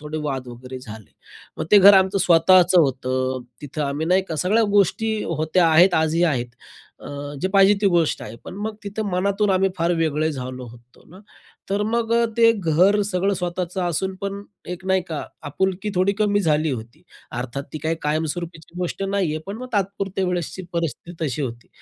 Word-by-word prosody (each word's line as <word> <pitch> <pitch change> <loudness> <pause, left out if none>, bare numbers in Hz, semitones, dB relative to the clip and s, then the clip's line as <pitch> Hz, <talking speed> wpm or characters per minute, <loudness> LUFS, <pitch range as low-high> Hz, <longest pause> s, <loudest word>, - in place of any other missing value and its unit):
थोडे 150 +1 -5
वाद 135 -4 -3
वगैरे 125 +2 -9
झाले. 110 - -11 0.5
मग - - -2
ते 205 - +9
घर 200 +1 +9
आमचं 190 +1 +3
स्वतःचं 180 0 +5
होतं, 130 -2 -1 0.2
तिथं 145 +1 -4
आम्ही 145 +3 -2
नाही 185 +2 +3
का 160 - -3
सगळ्या 195 +9 +2
गोष्टी 220 +3 +2
होत्या 165 +2 +1
आहेत 175 +3 +5
आजही 160 +1 +2
आहेत. 130 -8 0 0.5
अ, 145 0 -7
जे 185 - +1
पाहिजे 195 0 +6
ती - - +4
गोष्ट 170 -3 +1
आहे, 110 +2 -8
पण - - -8
मग 220 0 -3
तिथं 205 +2 -4
मनातून 200 +3 +1
आम्ही 190 0 +3
फार 170 +1 +1
वेगळे 160 -1 0
झालो 130 -2 -6
होतो 120 +1 -17
ना. 185 - -13 0.5
तर 200 +1 +1
मग 230 0 0 0.2
ते 230 -1 +6
घर 190 +1 +3
सगळं 195 0 0
स्वतःचं 180 0 -3
असून 180 +2 -1
पण 200 0 -4 0.3
एक 180 +1 -6
नाही 190 -1 +2
का, 155 -3 -4 0.2
आपुलकी 190 +7 -2
थोडी 185 +2 +2
कमी 205 -1 +2
झाली 155 -3 +1
होती. 115 -2 -7 0.3
अर्थात, 125 +3 -4
ती 155 - -4
काही 160 +2 -1
कायमस्वरूपीची 160 +2 -3
गोष्ट 180 +2 -3
नाही 195 -2 0
आहे, - - -2
पण 200 +2 -5
मग 255 - -6
तात्पुरत्या 195 -1 -1
वेळेसची 180 +1 -3
परिस्थिती 170 0 -4
तशी 145 0 -2
होती. 120 -3 -6
175 Hz, 180 wpm, -22 LUFS, 150-195 Hz, 0.5 s, ते